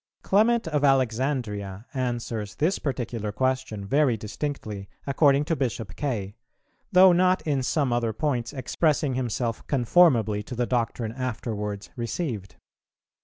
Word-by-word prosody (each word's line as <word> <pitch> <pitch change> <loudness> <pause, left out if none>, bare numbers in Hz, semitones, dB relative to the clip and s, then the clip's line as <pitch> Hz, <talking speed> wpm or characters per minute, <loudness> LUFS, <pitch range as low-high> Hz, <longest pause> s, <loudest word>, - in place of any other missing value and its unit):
_ - - -46
Clement 225 +1 +3
of 150 -2 0
Alexandria 120 -6 0
answers 120 -5 -3
this 165 +6 +1
particular 120 -6 -3
question 130 -3 -1
very 135 +1 +2
distinctly, 105 -3 -5 0.2
according 140 0 +3
to 165 - 0
Bishop 115 - -3
Kaye, 110 -9 -3 0.6
though 185 0 +8
not 185 +1 +3
in 145 -4 +1
some 130 -1 0
other 120 -2 +1
points 120 -1 -1
expressing 145 +1 0
himself 120 -2 -2
conformably 120 - +3
to 125 +4 -7
the 120 +1 0
doctrine 115 -2 -1
afterwards 110 -5 -4
received. 115 - -4
125 Hz, 125 wpm, -26 LUFS, 110-145 Hz, 0.6 s, though